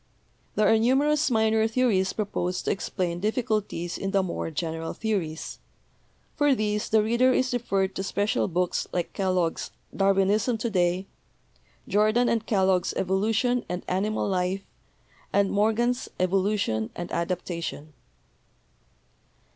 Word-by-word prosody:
There 210 -1 +3
are 225 +1 +5
numerous 280 +5 +3
minor 220 -1 +3
theories 220 -5 +2
proposed 185 -4 -2
to - - +1
explain 175 -3 -2
difficulties 210 -5 -1
in 195 - -2
the 195 0 +2
more 175 -2 -3
general 165 +1 -3
theories. 185 -8 -3 0.8
For 290 -2 +3
these 210 -2 -1
the 220 -1 +4
reader 235 +4 +3
is 255 0 +1
referred 195 -5 0
to 190 - -3
special 205 +4 0
books 180 0 -1
like 175 -2 -2
Kellogg's 185 -4 0 0.3
'Darwin 195 0 +3
ism 220 +3 +1
To 225 +1 -3
day,' 180 0 +1 0.8
Jordan 215 +4 +3
and 225 -1 0
Kellogg's 190 -3 +2
'Evolution 220 +6 +1
and 180 0 -3
Animal 200 +4 0
Life' 190 0 -1 0.7
and 200 -1 +2
Morgan's 230 +4 +1
'Evolution 185 - +1
and 175 0 -6
Adaptation.' 170 -3 -3
200 Hz, 125 wpm, -26 LUFS, 180-220 Hz, 0.8 s, are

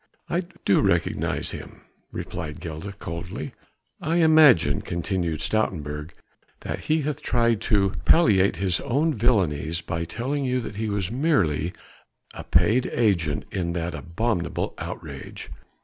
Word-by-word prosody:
"I 175 - +2 0.2
do 100 - +4
recognize - - 0
him," - - -9 0.3
replied 80 -3 -5
Gilda 85 +4 -6
coldly. 90 -2 -6 0.5
"I 160 +2 0
imagine," 150 - +6
continued 85 -2 -2
Stoutenburg, 75 -8 -1 0.5
"that - - -4
he 155 +1 +1
hath 150 -1 -3
tried 115 -3 +2
to 100 -3 +3
palliate 100 - +5
his 90 0 0
own 145 +5 +1
villainies 85 - +1
by 85 0 -3
telling 135 - -2
you 130 -1 +1
that 105 -3 -7
he 110 0 -1
was 100 -1 -2
merely 95 - +1 0.6
a - - -7
paid 105 +9 +3
agent 85 -10 +1
in 85 -3 -2
that 85 0 -2
abominable 90 +2 -2
outrage." - - -7
100 Hz, 130 wpm, -25 LUFS, 85-120 Hz, 0.6 s, imagine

